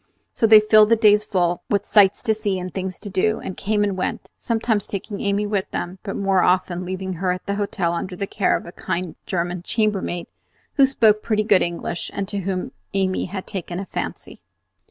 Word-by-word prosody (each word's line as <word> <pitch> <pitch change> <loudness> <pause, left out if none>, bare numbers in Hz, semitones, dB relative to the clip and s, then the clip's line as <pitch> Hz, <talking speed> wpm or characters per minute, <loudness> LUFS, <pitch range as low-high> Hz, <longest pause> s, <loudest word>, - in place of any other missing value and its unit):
So 225 - +2
they 215 -1 +9
filled 215 0 +5
the 230 - +6
days 210 -2 +4
full 175 -4 0
with 205 0 +1
sights 200 -2 +4
to 220 -3 +2
see 210 -3 -1
and 180 -1 -6
things 190 -1 -4
to - - -9
do, 210 +3 +1
and 190 - -6
came 210 0 0
and 200 -2 0
went; 185 - -3
sometimes 225 -3 0
taking 200 +1 -5
Amy 200 +1 0
with 205 -2 -1
them, 180 +2 -4
but 195 - -5
more 195 -2 +2
often 180 0 +1
leaving 190 0 -4
her 185 -1 +2
at 180 0 -4
the 200 - -1
hotel 200 -4 -1
under 180 +2 -4
the 200 - -3
care 195 0 +1
of - - -10
a 170 - -9
kind 180 -2 -4
German 175 -1 -2
chambermaid, 195 -4 -1 0.5
who 275 -2 +5
spoke 220 -5 +3
pretty 215 -1 0
good 205 -3 +4
English 170 0 -3
and 200 -1 -2
to 200 - -2
whom 185 -1 -3 0.2
Amy 190 -1 0
had 190 +1 -6
taken 180 -3 -5
a 195 - -4
fancy. 170 - -6
195 Hz, 210 wpm, -22 LUFS, 185-210 Hz, 0.5 s, they